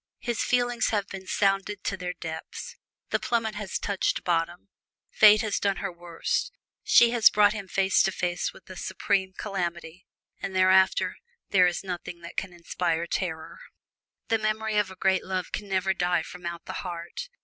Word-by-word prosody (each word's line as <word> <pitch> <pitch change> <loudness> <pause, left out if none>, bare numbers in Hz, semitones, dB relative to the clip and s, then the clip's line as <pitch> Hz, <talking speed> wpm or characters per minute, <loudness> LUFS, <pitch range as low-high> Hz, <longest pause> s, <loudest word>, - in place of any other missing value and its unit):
His 240 -2 -2
feelings 245 -1 +1
have 205 -3 0
been 190 -1 -8
sounded 195 0 0
to 195 - -1
their 180 -1 -4
depths 160 -2 -7 0.4
the - - +2
plummet 225 -2 0
has 210 -2 -3
touched 200 -2 -1
bottom. 175 +2 -1 0.4
Fate 215 0 +7
has 215 -3 -1
done 200 -1 +1
her 200 -1 -4
worst: 175 - -2 0.3
she 235 -1 +6
has 235 -2 +6
brought 205 0 +4
him 205 -3 -6
face 190 +1 +3
to 195 - +2
face 175 -1 -2
with 185 - -17
the 185 - -10
Supreme 190 +1 -1
Calamity, 175 -3 -4 0.3
and 190 - -4
thereafter 190 0 +4 0.3
there 185 -2 +6
is 175 +1 -2
nothing 175 -2 -6
that 170 - -10
can 195 - -2
inspire 170 -1 -2
terror. 165 -2 -4 0.7
The 225 - +2
memory 215 0 -1
of 205 -2 0
a 190 - -10
great 190 0 +1
love 185 -1 -3
can 205 - -4
never 190 0 +1
die 175 -2 +1
from 180 +1 -8
out 170 -1 -6
the - - -6
heart. 175 - -6
190 Hz, 175 wpm, -27 LUFS, 175-205 Hz, 0.7 s, Fate